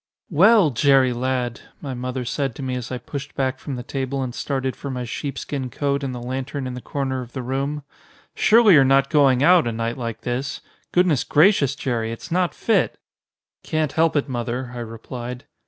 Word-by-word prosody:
"Well, 195 0 +6
Jerry, 135 0 +4
lad!" 125 -1 -2 0.2
my 140 -3 -5
mother 125 0 -4
said 135 0 -2
to 140 - -7
me 130 -1 -2
as 125 -1 -4
I 130 - -2
pushed 140 +3 -7
back 130 -1 -1
from 140 - -5
the 125 - -6
table 135 +1 -3
and 125 -2 -4
started 130 -1 -2
for 140 - -7
my 125 -2 -3
sheepskin 135 +1 -4
coat 140 +2 -1
and 135 - -2
the 125 - -5
lantern 130 +3 -4
in 130 - -4
the 125 - -7
corner 135 -2 -3
of 120 -1 -10
the 130 - -4
room. 140 +3 -2 0.5
"Surely 220 -2 +6
you're 145 -4 +7
not 135 +1 +3
going 135 -3 +4
out 175 -5 +6
a - - 0
night 115 +2 -3
like 115 -2 -4
this? 130 +3 -3 0.3
Goodness 175 -7 +3
gracious, 150 -4 +4
Jerry, 120 -5 -2
it's 115 - -8
not 180 0 +1
fit!" 205 -8 +1 0.6
"Can't 155 -3 -1
help 160 +2 +2
it, 145 -1 +1
Mother," 120 0 -3
I 120 - -6
replied. 120 +3 -7
130 Hz, 195 wpm, -22 LUFS, 125-145 Hz, 0.6 s, you're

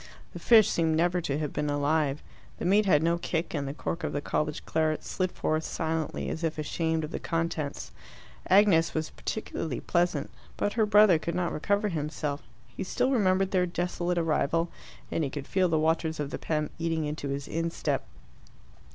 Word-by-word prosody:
The - - -7
fish 220 -3 +6
seemed 160 -1 +1
never 175 +2 +2
to 140 -3 -1
have 150 -2 -3
been 150 0 -1
alive, 145 0 +1 0.3
the - - -4
meat 200 +3 +4
had 150 -4 +4
no 170 +1 +2
kick, 165 0 -2
and 145 -3 -2
the 135 - -3
cork 170 +2 -4
of - - -2
the 145 - 0
college 150 +1 -2
claret 155 -1 0
slid 185 -1 -2
forth 155 0 -1
silently, 160 -1 -2
as 160 - -4
if 165 -1 -1
ashamed 160 +1 -1
of 155 - -5
the - - -3
contents. 165 -3 -3 0.6
Agnes 185 -4 +5
was 155 0 -2
particularly 160 - -4
pleasant. 170 -5 0 0.3
But 205 - 0
her 220 -2 +2
brother 205 -5 +6
could 170 +1 -3
not 175 -1 -1
recover 200 +6 +1
himself. 150 -3 -3 0.3
He 120 - -6
still 250 +7 0
remembered 190 -5 +2
their 180 -2 +2
desolate 175 0 -2
arrival, 165 0 +1 0.4
and 165 - 0
he 140 - -1
could 140 0 -6
feel 185 +2 +1
the 160 - +2
waters 160 0 +1
of 145 -1 -3
the - - -4
Pem 150 -2 -1
eating 165 -2 0
into 150 -1 -4
his 140 0 -3
instep. 165 +1 -1
165 Hz, 185 wpm, -28 LUFS, 150-180 Hz, 0.6 s, fish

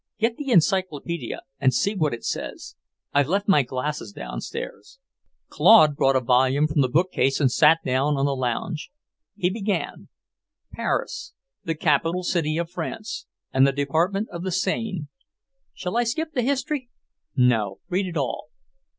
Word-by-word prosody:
Get 230 +2 0
the 290 -2 -5
encyclopaedia 170 - 0 0.2
and 130 - +4
see 200 - +1
what 155 -7 0
it 115 - -12
says. - - -5 0.4
I've 145 -1 +3
left 200 +3 0
my 190 -8 +5
glasses 135 +8 -4
downstairs." - - -7 0.5
Claude 155 -10 +6
brought 135 -1 +3
a - - +5
volume 130 +4 +3
from 150 -1 +1
the 130 - +2
bookcase 155 -3 +1
and 135 -4 +3
sat 155 +4 +5
down 135 +3 +1
on 135 - +1
the 140 -1 0
lounge. 130 +5 -3 0.5
He 180 0 0
began: 205 -1 -3 0.7
"Paris, 210 +1 -3 0.3
the 165 - -1
capital 165 +4 +1
city 160 -3 0
of 170 0 -1
France 230 - -5 0.3
and 130 +1 +5
the - - +3
Department 165 +10 0
of 170 - -6
the 185 +1 -3
Seine, 190 -2 -1 0.7
shall 180 +2 -5
I 240 - +3
skip 315 +7 -2
the 255 - +1
history?" 275 0 -1 0.5
"No. 115 -6 +2
Read 190 +1 0
it 170 -2 -4
all." 140 0 -2
165 Hz, 155 wpm, -24 LUFS, 140-200 Hz, 0.7 s, Claude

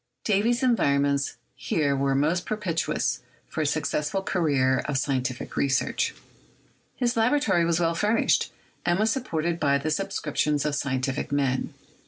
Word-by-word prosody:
Davy's 230 +5 +2
environments 140 - +2 0.2
here 145 -3 0
were 135 0 +1
most 155 +6 +1
pro 215 - -1
pitious 170 -6 -1 0.3
for 160 - -3
a 150 - +1
successful 150 +4 -1
career 140 -9 +2
of 145 -2 -1
scientific 130 -2 -2
research. 130 -2 0 0.8
His 245 -1 0
laboratory 225 -7 +2
was 170 0 +1
well 165 -1 +2
furnished, 210 +6 +2 0.3
and 175 0 +2
was 215 +2 +2
supported 170 - -2
by 140 -3 +3
the 155 +3 -2
subscriptions 150 -4 -1
of 150 - 0
scientific 135 -2 -2
men. 135 -2 0
155 Hz, 140 wpm, -26 LUFS, 140-195 Hz, 0.8 s, by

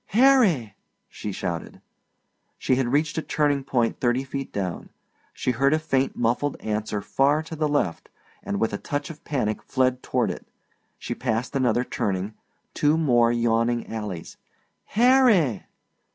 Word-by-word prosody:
"Harry!" 220 - +4 0.3
she 105 - -6
shouted. 85 -3 -5 0.8
She - - 0
had 130 -1 +1
reached 155 +5 +1
a - - -2
turning 145 -3 0
point 120 -3 0
thirty 125 +1 +1
feet 135 0 -5
down; 95 -4 -4 0.4
she - - -1
heard 135 +5 +2
a - - +2
faint 135 -4 0
muffled 120 +5 0
answer 105 -1 -3
far 145 +3 +2
to 160 0 -8
the 155 -1 0
left, 145 - -1 0.3
and 100 - -3
with 115 - 0
a 105 - -2
touch 145 +3 -3
of 155 - -14
panic 115 -7 -1
fled 130 -1 0
toward 120 -6 0
it. - - -9 0.5
She - - -4
passed 120 +2 -2
another 125 -2 +2
turning, 100 -3 -2 0.4
two 150 +2 +2
more 120 -7 +3
yawning 120 0 +1
alleys. 105 -6 -6 0.5
"Harry!" 225 - +3
130 Hz, 150 wpm, -24 LUFS, 110-145 Hz, 0.8 s, Harry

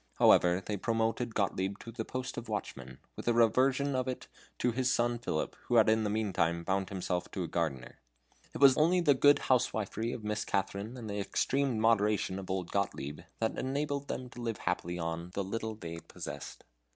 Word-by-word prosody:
However, 90 +2 +5
they 105 - -2
promoted 115 +2 -1
Gottlieb 95 -1 0
to 115 - -9
the 115 0 -4
post 130 +2 -5
of 120 -1 -6
watchman, 65 -11 -5 0.2
with - - -7
the 120 - +3
reversion 130 +4 +3
of 130 0 0
it 130 - -4 0.3
to 125 - +1
his 130 +2 +1
son 120 -1 +1
Philip, 80 -9 -2
who 120 - +1
had 110 -2 +6
in 110 0 +3
the 105 - 0
meantime 95 -6 0
bound 95 +1 0
himself 90 -2 -2
to 95 - -3
a - - -3
gardener. 80 -8 -3 0.6
It - - -4
was 135 -2 +8
only 170 +4 +4
the 150 -4 +5
good 145 +2 +6
housewifery 115 -3 0
of 115 - -6
Mistress 105 0 -2
Katharine, 100 +5 -2
and 115 -3 -7
the 105 0 -3
extreme 130 +4 0
moderation 105 -3 +2
of 95 - -8
old 95 -2 -2
Gottlieb, 70 +2 -2 0.2
that 110 - -1
enabled 140 +1 -2
them 130 - -4
to 120 - -9
live 115 -2 -2
happily 85 0 -2
on 85 0 -3
the 100 - 0
little 110 +3 -3
they 85 -5 -7
possessed. - - -8
110 Hz, 195 wpm, -32 LUFS, 95-125 Hz, 0.6 s, was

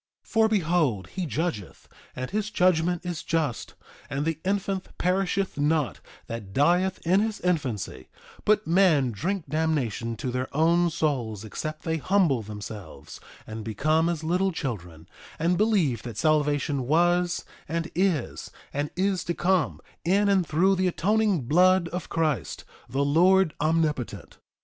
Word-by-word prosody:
3:18 - - -27
For 225 -1 +4
behold 165 - +1
he 185 -2 -4
judgeth, 145 - -4 0.3
and 130 0 -5
his 210 0 -1
judgment 180 -3 +2
is 175 -3 -3
just; 155 -7 -2 0.3
and 140 +2 -2
the 165 -1 -1
infant 195 0 -1
perisheth 190 -1 0
not 150 -2 +1 0.3
that 105 -4 -7
dieth 180 - +2
in 185 +4 +4
his 220 0 -1
infancy; 130 - -2 0.3
but 215 0 +3
men 165 -7 +3
drink 175 - -2
damnation 135 -7 -1
to 125 +4 -4
their 125 +1 -2
own 170 +2 +4
souls 120 -10 -2
except 155 +8 -5
they 160 0 -1
humble 165 - +2
themselves 105 -1 -9 0.3
and 110 0 -7
become 155 +10 +1
as 165 -2 -3
little 180 +4 +1
children, 90 - -6 0.3
and 170 +3 +1
believe 180 - +2
that 120 -4 -8
salvation 145 -2 +1
was, 175 +3 +2 0.2
and 165 +1 -2
is, 180 -7 -1 0.2
and 145 +1 -1
is 190 0 0
to 170 - -2
come, 185 -2 +1 0.2
in 200 +4 +3
and 190 -4 +2
through 180 +6 +3
the 185 0 +1
atoning 205 0 +1
blood 180 +6 +4
of 180 0 -5
Christ, 155 -6 -1 0.3
the 135 +4 0
Lord 180 +4 +4
Omnipotent. 155 -5 -1
160 Hz, 145 wpm, -26 LUFS, 135-185 Hz, 0.3 s, For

